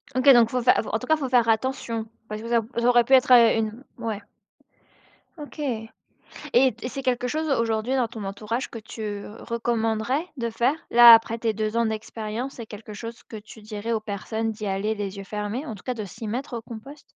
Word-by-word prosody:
OK, 255 Hz, +2 st, 0 dB
donc 235 Hz, -2 st, +5 dB
faut 250 Hz, 0 st, -1 dB
fai 250 Hz, -, +5 dB
faut -, -, -8 dB
en 220 Hz, -, 0 dB
tout 250 Hz, -, -7 dB
cas, 315 Hz, -, +4 dB
faut 270 Hz, -4 st, -3 dB
faire 240 Hz, -2 st, +4 dB
attention 230 Hz, -1 st, -1 dB, 0.2 s
parce 215 Hz, 0 st, -6 dB
que 230 Hz, -, -7 dB
ça 235 Hz, -1 st, +3 dB
au 235 Hz, +2 st, -6 dB
ça 240 Hz, -, +2 dB
aurait 240 Hz, -1 st, +6 dB
pu 265 Hz, -, 0 dB
être, 255 Hz, -1 st, +5 dB
heu, 235 Hz, -2 st, +7 dB
une 220 Hz, +4 st, -3 dB, 0.2 s
ouais. 220 Hz, -3 st, -3 dB, 1.2 s
OK, 300 Hz, +1 st, -10 dB, 0.9 s
et 255 Hz, -1 st, +5 dB
c'est 270 Hz, +1 st, -6 dB
quelque 250 Hz, -1 st, 0 dB
chose, 310 Hz, +4 st, -2 dB
aujourd'hui, 230 Hz, 0 st, 0 dB
dans 250 Hz, -3 st, +1 dB
ton 220 Hz, -3 st, -8 dB
entourage, 215 Hz, +5 st, -4 dB
que 230 Hz, -, -7 dB
tu 210 Hz, -2 st, -6 dB, 0.2 s
recommanderais 235 Hz, +4 st, -1 dB
de 235 Hz, -1 st, -2 dB
faire? 240 Hz, +5 st, +1 dB, 0.2 s
Là, 235 Hz, 0 st, +10 dB
après 225 Hz, 0 st, +4 dB
tes 225 Hz, -1 st, -1 dB
2 215 Hz, +2 st, -2 dB
ans 235 Hz, -, +3 dB
d'expérience, 220 Hz, +3 st, -4 dB
c'est 230 Hz, -, -8 dB
quelque 210 Hz, 0 st, -10 dB
chose 230 Hz, +3 st, -8 dB
que 220 Hz, -, -7 dB
tu 215 Hz, +1 st, -13 dB
dirais 215 Hz, +1 st, -5 dB
aux 220 Hz, -, +1 dB
personnes, 220 Hz, +2 st, -3 dB
d'y 215 Hz, -1 st, -7 dB
aller 200 Hz, +3 st, -1 dB
les 200 Hz, -1 st, -5 dB
yeux 195 Hz, -, -6 dB
fermés, 210 Hz, +7 st, -4 dB
en 220 Hz, -, -6 dB
tout 180 Hz, -, -15 dB
cas 250 Hz, -, -2 dB
de 215 Hz, -3 st, -5 dB
s'y 215 Hz, +3 st, -8 dB
mettre, 245 Hz, +2 st, -4 dB
au -, -, -6 dB
compost? 240 Hz, +7 st, -10 dB
230 Hz, 220 wpm, -25 LUFS, 215-245 Hz, 1.2 s, Là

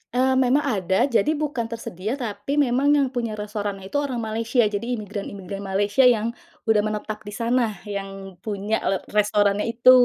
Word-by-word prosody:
Eee, 260 Hz, +1 st, +3 dB
memang 260 Hz, +3 st, +3 dB
ada, 190 Hz, -8 st, +1 dB
jadi 275 Hz, +3 st, +2 dB
bukan 290 Hz, -6 st, -2 dB
tersedia, 225 Hz, -1 st, -4 dB
tapi 240 Hz, +1 st, -3 dB
memang 275 Hz, -1 st, +2 dB
yang 280 Hz, -2 st, +3 dB
punya 235 Hz, -3 st, -2 dB
restorannya 205 Hz, -2 st, -4 dB
itu 285 Hz, -, +1 dB
orang 255 Hz, -5 st, -2 dB
Malaysia, 225 Hz, +3 st, +1 dB
jadi 215 Hz, +4 st, -1 dB
imigran-imigran 200 Hz, -2 st, -6 dB
Malaysia 205 Hz, +5 st, +3 dB
yang 230 Hz, -1 st, +3 dB, 0.3 s
udah 220 Hz, -2 st, +3 dB
menetap 215 Hz, 0 st, -2 dB
di 205 Hz, -, -6 dB
sana, 230 Hz, -1 st, +1 dB
yang 195 Hz, -2 st, -6 dB
punya 210 Hz, +2 st, -2 dB
le 195 Hz, -, +2 dB
restorannya 205 Hz, 0 st, +2 dB
itu. 235 Hz, +2 st, +6 dB
215 Hz, 160 wpm, -24 LUFS, 205-245 Hz, 0.3 s, itu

